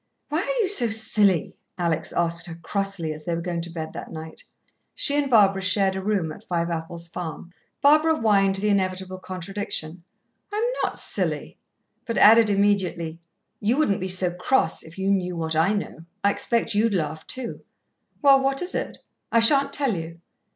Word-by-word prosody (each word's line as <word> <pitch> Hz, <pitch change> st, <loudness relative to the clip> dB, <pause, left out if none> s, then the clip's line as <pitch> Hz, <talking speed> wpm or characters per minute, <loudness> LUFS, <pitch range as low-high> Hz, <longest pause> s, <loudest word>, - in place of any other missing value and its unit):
"Why 305 Hz, +2 st, 0 dB
are -, -, -1 dB
you -, -, 0 dB
so 370 Hz, -, +5 dB
silly?" 210 Hz, -5 st, +2 dB, 0.2 s
Alex 170 Hz, -3 st, -1 dB
asked 170 Hz, 0 st, 0 dB
her 165 Hz, -, -7 dB
crossly, 185 Hz, -1 st, -3 dB
as 155 Hz, 0 st, -11 dB
they 170 Hz, +2 st, -2 dB
were 170 Hz, -, -4 dB
going 170 Hz, -1 st, -3 dB
to 170 Hz, -, -5 dB
bed 160 Hz, -2 st, -6 dB
that -, -, -8 dB
night. 160 Hz, 0 st, -9 dB, 0.5 s
She 285 Hz, -, +3 dB
and 290 Hz, -1 st, 0 dB
Barbara 200 Hz, -5 st, +4 dB
shared 190 Hz, 0 st, +3 dB
a 190 Hz, -, -3 dB
room 190 Hz, -5 st, -1 dB
at -, -, -11 dB
Fiveapples 170 Hz, -1 st, -3 dB
Farm. 170 Hz, 0 st, -7 dB, 0.3 s
Barbara 310 Hz, +3 st, +5 dB
whined 200 Hz, -4 st, +2 dB
the 205 Hz, +2 st, 0 dB
inevitable 185 Hz, -1 st, -1 dB
contradiction, 185 Hz, -2 st, -5 dB, 0.5 s
"I'm 420 Hz, +2 st, -1 dB, 0.2 s
not -, -, -2 dB
silly," -, -, -2 dB, 0.5 s
but 230 Hz, -, -2 dB
added 225 Hz, +1 st, +7 dB
immediately, 190 Hz, -5 st, 0 dB, 0.4 s
"you 225 Hz, +5 st, 0 dB
wouldn't 205 Hz, -12 st, +1 dB
be 185 Hz, -, -2 dB
so 185 Hz, -1 st, +2 dB
cross, 180 Hz, 0 st, 0 dB
if 160 Hz, +2 st, -13 dB
you 190 Hz, +1 st, 0 dB
knew 180 Hz, -2 st, -1 dB
what 160 Hz, -1 st, -2 dB
I 165 Hz, +5 st, +3 dB
know. 200 Hz, -5 st, -5 dB, 0.2 s
I 200 Hz, -, +4 dB
expect 235 Hz, +2 st, -1 dB
you'd 215 Hz, 0 st, +1 dB
laugh 155 Hz, -2 st, -3 dB
too." 255 Hz, -2 st, -5 dB, 0.6 s
"Well, 275 Hz, -1 st, +6 dB
what 270 Hz, +3 st, 0 dB
is 360 Hz, -, -2 dB
it?" -, -, -4 dB, 0.3 s
"I 230 Hz, -, +4 dB
shan't 275 Hz, +4 st, +5 dB
tell 280 Hz, -5 st, +1 dB
you." 165 Hz, 0 st, -7 dB
195 Hz, 180 wpm, -24 LUFS, 170-225 Hz, 0.6 s, added